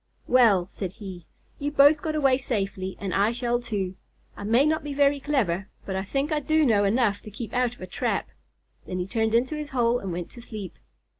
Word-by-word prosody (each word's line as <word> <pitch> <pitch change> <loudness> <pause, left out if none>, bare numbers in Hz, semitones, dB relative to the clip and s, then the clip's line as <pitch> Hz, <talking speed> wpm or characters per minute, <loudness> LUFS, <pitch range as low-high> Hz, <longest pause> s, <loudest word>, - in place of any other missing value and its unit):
"Well," 220 -8 +5
said 190 -1 -6
he, 185 -5 -9 0.3
"you 285 - -1
both 290 +1 +6
got 310 -1 -2
away 270 -3 +3
safely, 195 -6 -3
and 195 -3 -3
I 205 +3 +3
shall 240 0 0
too. 200 -6 -3 0.4
I - - -8
may 230 +7 +4
not 315 +1 +1
be 290 -1 -5
very 285 0 +3
clever, 215 -11 0 0.2
but 190 - -3
I 190 - -1
think 275 - -1
I 305 - +2
do 310 +1 +2
know 205 -5 +3
enough 205 -1 +2
to - - -10
keep 220 +2 -7
out 245 -1 +1
of - - -20
a - - -4
trap." 180 - -2 0.6
Then 185 - -3
he 180 - -1
turned 220 +2 0
into 255 +6 +1
his 300 -1 -5
hole 245 -2 +2
and 195 -4 -5
went 175 0 -5
to 240 - -11
sleep. 215 -6 -7
235 Hz, 220 wpm, -26 LUFS, 195-275 Hz, 0.6 s, both